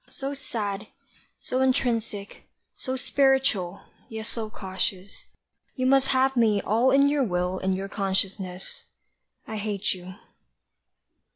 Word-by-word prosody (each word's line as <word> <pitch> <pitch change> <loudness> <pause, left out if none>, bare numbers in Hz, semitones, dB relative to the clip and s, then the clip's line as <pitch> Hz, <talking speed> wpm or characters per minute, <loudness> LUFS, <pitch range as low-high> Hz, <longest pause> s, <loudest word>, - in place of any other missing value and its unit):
so 275 +1 -4
sad, 215 -6 -4 0.5
so 255 +1 -2
intrinsic, 230 -6 0 0.3
so 260 -1 -4
spiritual, 265 -9 +2 0.3
yet 220 -1 -5
so 225 -2 -3
cautious, 190 -1 -3 0.5
you 255 - -1
Must 270 +1 +5
have 265 0 +3
me 220 -4 +4
all 230 +6 +3
in 275 +1 +6
your 285 -1 +2
will 180 -3 0
and 190 0 +1
your 195 +1 -3
consciousness 190 -2 -2 0.6
I 220 - -4
hate 205 -2 -1
you. 185 0 -9
215 Hz, 120 wpm, -26 LUFS, 195-260 Hz, 0.6 s, in